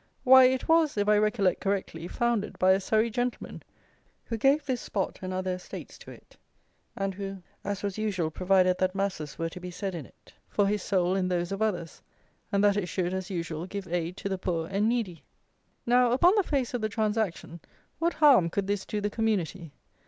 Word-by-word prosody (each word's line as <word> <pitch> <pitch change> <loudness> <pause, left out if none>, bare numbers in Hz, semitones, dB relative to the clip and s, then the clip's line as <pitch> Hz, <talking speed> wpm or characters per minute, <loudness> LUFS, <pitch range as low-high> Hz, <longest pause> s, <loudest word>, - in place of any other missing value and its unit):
Why, 260 0 +8
it 260 0 +1
was, 320 -6 +3
if 205 0 +1
I 210 0 +5
recollect 210 -3 +1
correctly, 190 -4 -2
founded 235 -1 -1
by 185 0 +4
a 190 - +4
Surrey 220 +3 +1
gentleman, 245 +2 -3 0.6
who 230 - -3
gave 275 +6 +2
this 255 -4 -2
spot 195 -2 -3
and 185 0 -4
other 185 0 -2
estates 180 0 -9
to - - -12
it, - - -15 0.6
and 195 0 -2
who, 195 -1 -6 0.2
as 200 -1 -4
was 200 0 -3
usual, 185 -7 -1
provided 185 +1 +2
that 185 0 0
masses 185 -7 -3
were 165 0 -2
to 180 - -9
be 180 0 -7
said 190 +2 -4
in 160 -7 -6
it - - -23 0.2
for 205 - +2
his 205 0 0
soul 185 -2 +1
and 185 -1 0
those 175 0 -1
of 195 +2 -3
others, 180 -7 -2 0.5
and 200 -1 +2
that 205 0 +4
it 195 -3 -1
should, 180 +1 -2
as 190 -1 -4
usual, 170 -2 -4
give 200 -1 -6
aid 175 +1 -2
to - - -4
the 190 -1 -2
poor 165 -3 -2
and 205 +3 +2
needy. 220 -9 -2 0.6
Now, 245 0 +4
upon 345 +9 +5
the 415 - +4
face 275 -9 -1
of 245 - -2
the 215 - -1
transaction, 210 -6 -2 0.4
what 335 +1 +1
harm 275 - +5
could 200 +3 -2
this 200 0 -2
do 210 - -2
the 205 - 0
community? 200 -8 -1
200 Hz, 205 wpm, -28 LUFS, 180-220 Hz, 0.6 s, Why